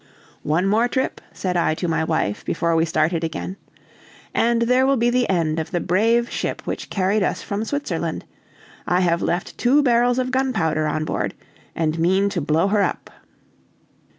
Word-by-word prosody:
"One 160 Hz, +5 st, 0 dB
more 220 Hz, +5 st, +3 dB
trip," 260 Hz, +1 st, -2 dB
said 180 Hz, -2 st, -3 dB
I 170 Hz, -2 st, +2 dB
to 175 Hz, -, -3 dB
my 160 Hz, -1 st, 0 dB
wife, 160 Hz, -10 st, -1 dB
before 170 Hz, 0 st, 0 dB
we 165 Hz, 0 st, +3 dB
started 160 Hz, +1 st, 0 dB
again, 165 Hz, +3 st, -4 dB, 0.8 s
"and 235 Hz, 0 st, +2 dB
there 250 Hz, +2 st, +3 dB
will 275 Hz, 0 st, +3 dB
be 240 Hz, +1 st, +2 dB
the 250 Hz, 0 st, +1 dB
end 165 Hz, -4 st, +1 dB
of 160 Hz, -, -4 dB
the 175 Hz, -, -1 dB
brave 230 Hz, +7 st, +2 dB
ship -, -, -3 dB
which -, -, -5 dB
carried 195 Hz, +2 st, +1 dB
us 185 Hz, -, -1 dB
from 205 Hz, +2 st, -3 dB
Switzerland. 285 Hz, +4 st, -3 dB, 0.6 s
I 180 Hz, +1 st, +2 dB
have 170 Hz, -1 st, +1 dB
left 175 Hz, +3 st, -2 dB
two 275 Hz, +4 st, +4 dB
barrels 245 Hz, -1 st, +3 dB
of 255 Hz, 0 st, -1 dB
gunpowder 195 Hz, -13 st, 0 dB
on 155 Hz, +1 st, -1 dB
board -, -, -2 dB, 0.4 s
and 160 Hz, 0 st, -1 dB
mean 190 Hz, +4 st, +2 dB
to 180 Hz, -4 st, -2 dB
blow 155 Hz, +5 st, +2 dB
her 205 Hz, 0 st, +2 dB
up." -, -, -2 dB
185 Hz, 180 wpm, -22 LUFS, 165-235 Hz, 0.8 s, two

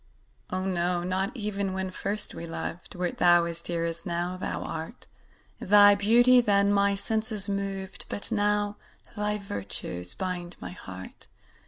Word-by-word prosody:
Oh, 185 Hz, +1 st, -2 dB
no 175 Hz, -1 st, 0 dB
not 185 Hz, +2 st, -1 dB
even 200 Hz, -3 st, -2 dB
when 190 Hz, 0 st, -3 dB
first 205 Hz, +3 st, -2 dB
we 170 Hz, -, -7 dB
loved, 165 Hz, +3 st, -6 dB
Wert 180 Hz, -1 st, -3 dB
thou 175 Hz, -1 st, +5 dB
as 170 Hz, 0 st, +1 dB
dear 170 Hz, -1 st, -1 dB
as 165 Hz, 0 st, -3 dB
now 175 Hz, 0 st, -2 dB
thou 185 Hz, -, -4 dB
art; 165 Hz, +9 st, -7 dB, 0.5 s
Thy 205 Hz, +1 st, +7 dB
beauty 240 Hz, +5 st, +5 dB
then 200 Hz, -2 st, +3 dB
my 200 Hz, 0 st, +3 dB
senses 220 Hz, 0 st, +2 dB
moved, 195 Hz, -1 st, -4 dB
But 205 Hz, -, -3 dB
now 205 Hz, -1 st, +1 dB, 0.4 s
thy 210 Hz, 0 st, -1 dB
virtues 95 Hz, -, -1 dB
bind 180 Hz, -2 st, -4 dB
my -, -, -7 dB
heart. 95 Hz, -, -10 dB
190 Hz, 150 wpm, -27 LUFS, 175-205 Hz, 0.5 s, Thy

